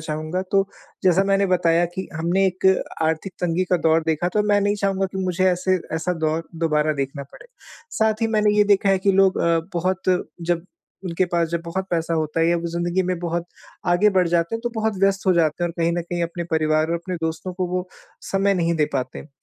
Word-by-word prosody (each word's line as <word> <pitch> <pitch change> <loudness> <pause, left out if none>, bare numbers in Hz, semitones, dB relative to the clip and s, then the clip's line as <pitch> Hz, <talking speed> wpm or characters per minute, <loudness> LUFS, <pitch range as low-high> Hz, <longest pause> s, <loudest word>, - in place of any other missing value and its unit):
चाहूँगा 155 +3 -3
तो 195 -1 +3 0.4
जैसा 185 +1 +4
मैंने 195 0 +2
बताया 175 -2 +3
कि 190 +1 -5
हमने 175 +5 +1
एक 185 0 -1 0.4
आर्थिक 160 +4 -1
तंगी 175 +1 +1
का - - +6
दौर 160 -1 +2
देखा, 160 +2 +1
तो 210 +3 +1
मैं 205 -1 +2
नहीं 205 +1 +1
चाहूँगा 195 -1 0
कि 190 - -4
मुझे 180 0 0
ऐसे 185 +1 +1 0.2
ऐसा 160 +3 -1
दौर 160 +1 -1
दोबारा 155 -2 +1
देखना 140 0 -4
पड़े। 140 - -15 0.4
साथ 220 0 0
ही - - +3
मैंने 215 -1 +2
ये 210 - +5
देखा 200 -1 +3
है 195 -1 +4
कि 195 +1 +2
लोग 190 0 +3
अ, 170 0 +2 0.2
बहुत 185 +2 -1 0.4
जब 170 +1 -1 0.4
उनके 180 +1 0
पास 170 -1 +1
जब 170 0 -2
बहुत 185 +3 -3
पैसा 165 -1 0
होता 155 0 -1
है 165 - +3
या 170 - +3
वो 170 - -4
ज़िंदगी 175 +2 -1
में 180 -2 -1
बहुत 170 0 -2 0.4
आगे 175 +4 +4
बढ़ 185 -3 +2
जाते 170 +4 +1
हैं 225 - -3
तो 240 - -3
बहुत 220 -1 -1
व्यस्त 195 0 +1
हो 185 - +5
जाते 170 -1 +1
हैं 175 - 0
और - - -6
कहीं 165 0 +2
न - - 0
कहीं 175 0 -3
अपने 170 +1 -3
परिवार 155 -1 +2
और - - +1
अपने 170 +2 -4
दोस्तों 160 +3 -3
को 185 0 -2
वो 180 0 -2 0.4
समय 195 0 +2
नहीं 170 -1 +1
दे 150 - +3
पाते 130 -1 -3
हैं। 150 - -11
175 Hz, 230 wpm, -22 LUFS, 165-190 Hz, 0.4 s, का